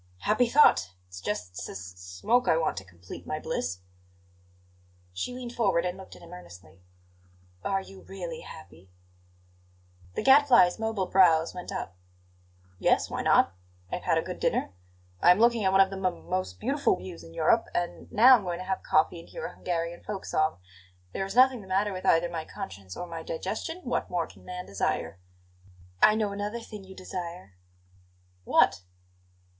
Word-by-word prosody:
"Happy 230 - +2
thought! 230 - +5
It's 90 0 -10
just 90 -2 -3
s - - -6
s 95 - -6 0.2
smoke 90 - 0
I 160 - +4
want 165 - 0
to 95 - -4
complete 90 -1 -12
my - - -2
bliss." 90 +2 -3 1.3
She 90 - -3
leaned 245 -1 -7
forward 195 -8 +1
and 180 0 -2
looked 190 0 -12
at - - -15
him - - -12
earnestly. 90 +1 -13 0.8
"Are 195 -1 0
you 190 0 -13
really 175 -4 -7
happy?" 95 - -13 1.3
The - - -2
Gadfly's 265 -10 +6
mobile 220 -4 -1
brows 170 -4 +4
went 180 -1 -7
up. 90 - -5 0.8
"Yes; - - +2
why - - -2
not? - - +4 0.4
I - - -1
have - - -11
had - - +3
a - - +1
good - - -6
dinner; - - 0 0.5
I - - +6
am 180 - +7
looking 235 -1 +4
at 190 - +3
one 195 0 +6
of 190 0 +3
the 195 - -5
m 185 - -3
most 95 0 -3
beautiful - - +1
views 90 -2 -9
in 80 0 -13
Europe; - - +3
and 175 0 -3
now 245 +3 +8
I'm 210 - -7
going 175 -2 -3
to 185 - -7
have 190 0 -2
coffee 160 +2 +2
and 165 - -14
hear - - -6
a - - -6
Hungarian 170 -1 -3
folk 200 -2 -5
song. 155 - 0 0.6
There 195 - -2
is 195 - -7
nothing 255 -1 +5
the 190 - -13
matter 195 +2 +1
with 185 - -5
either 165 +1 +4
my 170 -2 -4
conscience 95 - -8
or 175 - -4
my 165 -2 -7
digestion; 215 - -4
what 250 - -2
more 175 -2 -1
can - - -17
man 180 0 -6
desire?" 90 -2 -2 0.8
"I 215 - +7
know 215 -2 0
another 205 +3 -4
thing 210 -3 -10
you 190 0 -13
desire." 175 - -7 0.9
"What?" 90 +1 +3
180 Hz, 180 wpm, -28 LUFS, -, 1.3 s, now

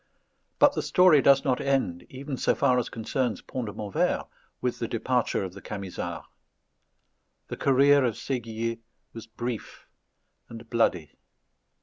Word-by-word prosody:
But - - +5
the - - -1
story 180 -6 +5
does 140 +2 +5
not 130 -2 +1
end, 130 -11 -1
even 135 +1 -6
so - - +1
far 125 -3 +3
as 120 - -3
concerns 115 -1 -2
Pont 125 -3 -5
de 105 - -6
Montvert, 105 -3 -1 0.3
with 125 - -2
the 115 - -2
departure 120 -1 0
of 95 -2 -6
the - - -11
Camisards. 100 -3 -6 1.2
The - - -5
career 140 +1 +4
of 120 -4 0
Séguier 115 -3 -3 0.3
was 115 -1 -9
brief 120 0 -6 0.6
and 115 0 -10
bloody. 90 - +1
120 Hz, 140 wpm, -27 LUFS, 110-135 Hz, 1.2 s, But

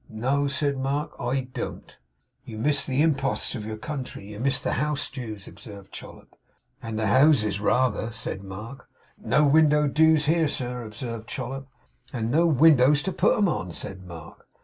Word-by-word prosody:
'No,' 135 +6 0
said 140 0 0
Mark, 140 +3 -2
'I 130 +1 -2
don't.' - - -6 0.5
'You 110 - -9
miss 145 +6 +1
the 135 +3 +2
imposts 135 -4 0
of 110 - -5
your 110 0 -5
country. 130 -5 -6
You 105 - -8
miss 135 +2 +1
the - - -2
house 150 -1 -1
dues?' 110 -7 -7
observed 100 -5 -12
Chollop. - - -12 0.5
'And 115 -1 -5
the 110 - 0
houses 110 - +4
rather,' 115 0 +1
said 105 -3 -4
Mark. 105 +7 -9 0.3
'No 140 +7 +3
window 150 0 +4
dues 155 +1 +4
here, 160 +1 +3
sir,' 125 -3 -3
observed 115 +1 -7
Chollop. 135 +2 -5 0.4
'And 115 -2 -2
no 165 +5 +4
windows 145 -1 +5
to 190 - -2
put - - +2
'em 205 - +3
on,' 90 - -3
said 95 +2 -7
Mark. 85 -4 -12
130 Hz, 170 wpm, -25 LUFS, 110-145 Hz, 0.5 s, windows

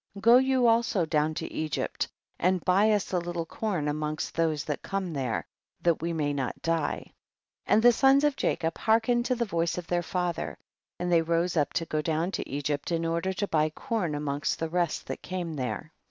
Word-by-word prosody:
go 230 +4 +7
you 260 -1 +3
also 230 -5 +3
down 155 -1 +1
to 165 0 -5
Egypt 155 -2 -2 0.3
and 185 -1 +1
buy 195 +4 +4
us 205 -2 0
a 180 - +3
little 175 -1 -3
corn 180 -5 -2
amongst 150 +1 -2
those 160 -3 0
that 150 -1 -3
come 195 -3 -3
there, 130 -6 -2 0.3
that 170 -3 +1
we 170 +1 -1
may 150 -3 0
not 135 -3 -3
die. 165 -3 0 0.6
3. - - +3
And 220 - +4
the 245 - +9
sons 270 +4 +4
of 295 -2 +3
Jacob 165 -9 -1
hearken 225 +2 +3
ed 240 - -2
to 255 - +1
the 235 0 0
voice 170 -4 -1
of 180 - -4
their 175 0 0
father, 175 - -2 0.4
and 175 0 -2
they 170 -1 +5
rose 170 +2 0
up 150 -3 +2
to 165 - 0
go 155 -1 -1
down 160 +3 0
to - - -4
Egypt 145 +3 -2
in 165 0 0
order 170 +3 0
to 205 +2 -2
buy 155 -3 +2
corn 175 -1 -2
amongst 145 0 -1
the 165 - -3
rest 175 0 -1
that - - -5
came 180 -3 -4
there. 130 +1 -4
170 Hz, 210 wpm, -28 LUFS, 155-195 Hz, 0.6 s, the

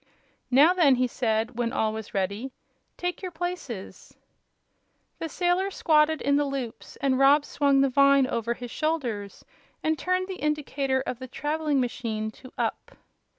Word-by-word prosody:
"Now, 290 +7 +6
then," 315 -8 +5
he 255 0 +2
said, 230 -1 -1
when 235 -1 0
all 220 -4 0
was 220 -1 -7
ready, 200 +7 -2 0.5
"take 355 -1 -3
your 370 - -4
places." 335 - -6 1.0
The 325 - -4
sailors 360 +4 0
squatted 305 -1 +3
in 280 0 +3
the 290 - +2
loops, 270 -5 -5
and 265 -2 0
Rob 285 +2 +5
swung 280 -2 +2
the 275 - +4
vine 275 0 +5
over 235 -1 -2
his 245 -1 -8
shoulders 245 -11 -3 0.4
and 315 0 0
turned 365 0 0
the 380 -2 -6
indicator 280 -3 0
of 250 - -4
the 260 - -7
traveling 295 +2 -1
machine 225 -3 -2
to 255 +4 -14
"up." - - -3
275 Hz, 155 wpm, -26 LUFS, 240-310 Hz, 1.0 s, Now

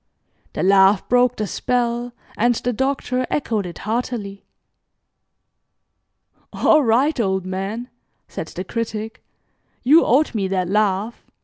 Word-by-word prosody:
The - - -2
laugh 195 +1 +4
broke 250 0 +3
the 215 - -2
spell, 240 +3 -1 0.2
and 240 +2 +2
the 245 +2 -2
Doctor 255 0 -1
echoed 220 -9 -1
it 175 - -9
heartily. 215 -3 -4 2.1
"All 310 - +4
right, 255 +5 +2
old 190 -4 0
man," 195 +6 -4 0.4
said 160 - -6
the 180 - -6
Critic, 220 +1 -5 0.6
"you 300 +7 +6
owed 275 +5 +2
me 200 -4 -1
that 185 -2 -1
laugh. 210 +2 0
225 Hz, 120 wpm, -21 LUFS, 195-245 Hz, 2.1 s, you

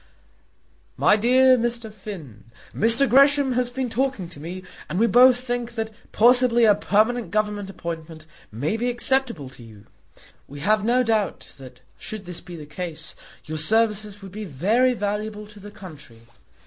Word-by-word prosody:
MY - - +4
DEAR 255 +3 +4
MR. 235 -2 -3
FINN, 165 - -10 0.3
Mr. 230 +6 +4
Gresham 275 +2 +5
has 250 0 0
been 260 +1 -3
talking 240 -5 -2
to 160 - -11
me, 180 +5 -7 0.3
and 160 - -3
we 225 - +3
both 245 +1 +6
think 245 -1 -4
that 220 -1 -4 0.2
possibly 240 +1 +4
a 210 - +6
permanent 215 +4 0
Government 210 -2 -2
appointment 165 -3 -8 0.3
may 140 - -2
be 245 +2 -1
acceptable 245 - 0
to 130 - -16
you. 110 -3 -15 0.6
We 145 +1 -10
have 210 +4 +1
no 245 +3 +2
doubt, 220 -3 -2
that 125 -1 -13 0.2
should 215 -1 -7
this 175 -1 -7
be 175 - -11
the 155 -3 -9
case, 165 +1 -7 0.3
your 155 +1 -5
services 210 +2 +1
would 195 - -10
be 215 +3 -7
very 210 - +1
valuable 210 0 -4
to 210 0 -15
the 205 +1 -11
country. 155 - -13
210 Hz, 160 wpm, -23 LUFS, 175-240 Hz, 0.6 s, both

